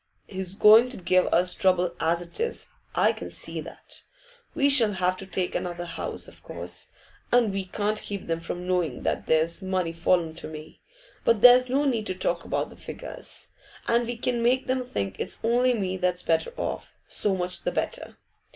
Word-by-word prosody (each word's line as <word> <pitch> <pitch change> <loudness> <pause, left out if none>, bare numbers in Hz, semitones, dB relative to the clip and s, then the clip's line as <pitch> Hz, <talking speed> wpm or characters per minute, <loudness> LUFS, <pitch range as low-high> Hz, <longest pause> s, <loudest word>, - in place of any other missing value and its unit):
H's 190 -1 -5
going 220 +4 +7
to 250 - -2
give 185 0 +2
us 180 +1 +3
trouble 180 -2 +2
as 170 +2 +1
it 170 - -7
is, 465 +1 -2 0.3
I - - +4
can - - -7
see - - -5
that. - - -9 0.5
We 280 -3 +3
shall 240 -7 +6
have 185 -1 +1
to 195 - -8
take 185 -1 -1
another 175 -1 -3
house, 170 - -4
of - - -14
course, - - -6 0.4
and 235 -4 +4
we 195 -1 -2
can't 210 +3 -1
keep 200 -2 -5
them 165 0 -1
from 175 +2 -5
knowing 175 -8 -1
that - - -1
there's 160 +3 +2
money 185 -3 -1
fallen 170 -1 +1
to - - -4
me. 155 0 -10 0.4
But 230 -3 +3
there's 250 +1 +8
no 280 +3 +2
need 230 -6 0
to 185 - -2
talk 175 -2 -1
about - - -2
the - - -14
figures, - - -7 0.4
and 235 +1 +3
if 235 - -4
we 240 0 -4
can 240 0 -1
make 250 +3 +2
them 255 0 0
think 100 - -4
it's - - -2
only 245 +2 +3
me 190 -3 -2
that's 180 -1 -1
better 165 - +1
off, - - -4
so 205 -2 0
much 180 0 -3
the - - -1
better. - - -3
190 Hz, 195 wpm, -26 LUFS, 175-235 Hz, 0.5 s, there's